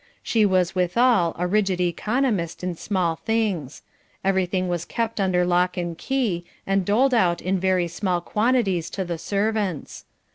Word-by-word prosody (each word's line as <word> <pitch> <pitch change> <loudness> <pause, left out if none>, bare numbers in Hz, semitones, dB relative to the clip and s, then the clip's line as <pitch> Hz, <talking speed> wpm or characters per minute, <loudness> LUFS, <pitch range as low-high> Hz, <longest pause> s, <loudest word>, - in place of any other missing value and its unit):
She 220 -3 +3
was 185 -2 +1
withal, 185 0 +2
a 180 - -1
rigid 190 -1 +1
economist 185 - -1
in 180 -1 -1
small 170 -2 -1
things. 205 - -2 0.4
Everything 185 -1 +1
was 175 -2 -2
kept 230 +3 -3
under 180 -2 +2
lock 180 +1 +1
and 175 -1 -3
key, 220 -5 -1 0.2
and 195 0 +1
doled 245 +8 +2
out 180 -7 +3
in 185 +1 -1
very 185 -1 +1
small 180 +1 -1
quantities 210 -4 0
to 190 - -4
the 170 -2 -4
servants. 200 -3 -2
185 Hz, 150 wpm, -23 LUFS, 175-215 Hz, 0.4 s, She